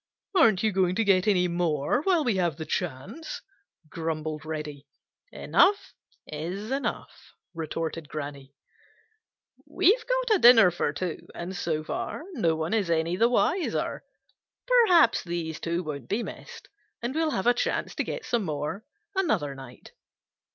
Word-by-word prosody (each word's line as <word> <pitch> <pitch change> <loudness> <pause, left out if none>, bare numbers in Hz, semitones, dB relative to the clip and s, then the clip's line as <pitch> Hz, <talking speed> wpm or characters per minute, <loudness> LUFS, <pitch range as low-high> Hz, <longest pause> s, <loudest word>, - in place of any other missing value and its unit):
"Aren't 220 - +5
you 220 - +3
going 185 -2 +1
to 225 - +2
get 195 -1 +3
any 180 -3 +3
more 170 - 0
while 350 -2 +2
we 235 -7 +1
have 175 -5 +1
the 160 - -5
chance?" 175 - -4 0.4
grumbled 155 -1 -4
Reddy. 150 -2 -6 0.4
"Enough 405 +1 +2 0.3
is 180 - -5
enough," 275 +1 -4 0.2
retorted 165 -1 -4
Granny. 140 -2 -7 1.1
"We've 395 +6 +3
got - - +2
a - - -8
dinner 230 - +8
for 175 - -1
two, 170 +3 -5
and 180 +3 -5
so 160 -5 -2
far 225 - -4
no 170 - +1
one 160 +5 -2
is 205 -6 +1
any 165 +1 +1
the 230 +5 +3
wiser. 345 +8 0 0.6
Perhaps 470 -9 +5
these 170 -2 -4
two 170 +2 -2
won't 140 -6 -6
be 225 +4 0
missed, - - -10 0.4
and 240 +2 -2
we'll 320 +1 +1
have 190 -9 -2
a 245 - +5
chance - - -2
to - - -1
get 485 - -5
some 235 -3 0
more 155 +5 -4 0.3
another 220 - 0
night. 135 -2 -12
180 Hz, 150 wpm, -27 LUFS, 155-240 Hz, 1.1 s, dinner